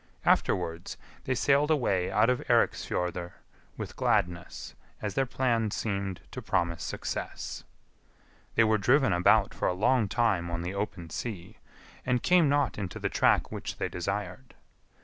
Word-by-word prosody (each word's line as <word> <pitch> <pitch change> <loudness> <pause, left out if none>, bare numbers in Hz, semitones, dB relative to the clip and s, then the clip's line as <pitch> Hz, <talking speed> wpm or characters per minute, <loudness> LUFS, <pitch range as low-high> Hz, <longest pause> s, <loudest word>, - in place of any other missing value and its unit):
Afterwards 85 -1 +1 0.3
they 130 - 0
sailed 140 +4 +3
away 100 - +1
out 110 +2 +3
of 125 -1 +2
Eiriksfjordr 90 0 0 0.4
with - - -6
gladness, 90 0 -1 0.3
as 105 -2 -3
their 135 -1 +1
plan 120 -4 +1
seemed 100 -3 -3
to - - -6
promise 85 -2 -1
success. - - -5 0.9
They 115 - +5
were 110 -1 +3
driven 125 0 +3
about 90 +1 +4
for - - -1
a - - +1
long 110 +3 +2
time 100 -5 +1
on 85 0 -3
the 90 +2 -3
open 100 -5 -4
sea, 105 -1 -6 0.4
and 125 -1 0
came 175 -5 +4
not 145 -5 +1
into 95 -3 -4
the - - -2
track - - +2
which - - -5
they - - -2
desired. 100 +7 -4
105 Hz, 150 wpm, -29 LUFS, 90-125 Hz, 0.9 s, They